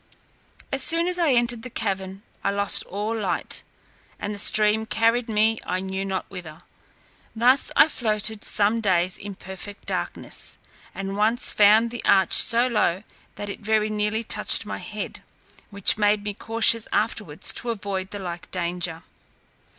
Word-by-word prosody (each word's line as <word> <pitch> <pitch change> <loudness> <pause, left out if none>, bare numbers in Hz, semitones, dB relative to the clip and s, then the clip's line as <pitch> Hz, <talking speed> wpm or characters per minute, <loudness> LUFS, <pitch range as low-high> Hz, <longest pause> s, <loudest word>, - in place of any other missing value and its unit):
As 270 - -1
soon 330 +4 +3
as 360 0 -1
I 325 -6 +3
entered 240 -1 +1
the 255 - -8
cavern, 195 -3 -4 0.2
I - - +1
lost 200 0 +1
all 210 +4 -4
light, 220 - -2 0.6
and 205 - -4
the 205 - -3
stream 215 +1 +2
carried 230 +2 +1
me 220 +1 +2
I 185 - -2
knew 190 +1 -4
not 190 -1 -3
whither. 165 -5 -10 0.7
Thus 250 +4 +5
I - - +7
floated 215 -5 -1
some 210 +2 +2
days 185 -3 +1
in 200 -1 -7
perfect 190 +2 -10
darkness, - - -4 0.4
and 195 0 -5
once 220 +4 +3
found 215 +3 +4
the 240 - -7
arch 190 -1 +3
so 235 +1 +5
low, 210 -6 0 0.3
that 205 - -6
it - - -9
very 215 0 0
nearly 210 +1 -1
touched - - +3
my - - -5
head, - - -7 0.5
which 200 +1 +3
made 205 0 +2
me 210 -1 -3
cautious 225 +1 +1
afterwards 205 -6 -1
to 240 - -4
avoid 195 -4 -4
the 205 - -7
like 175 -3 -7
danger. 170 -2 -3
210 Hz, 160 wpm, -23 LUFS, 195-225 Hz, 0.7 s, I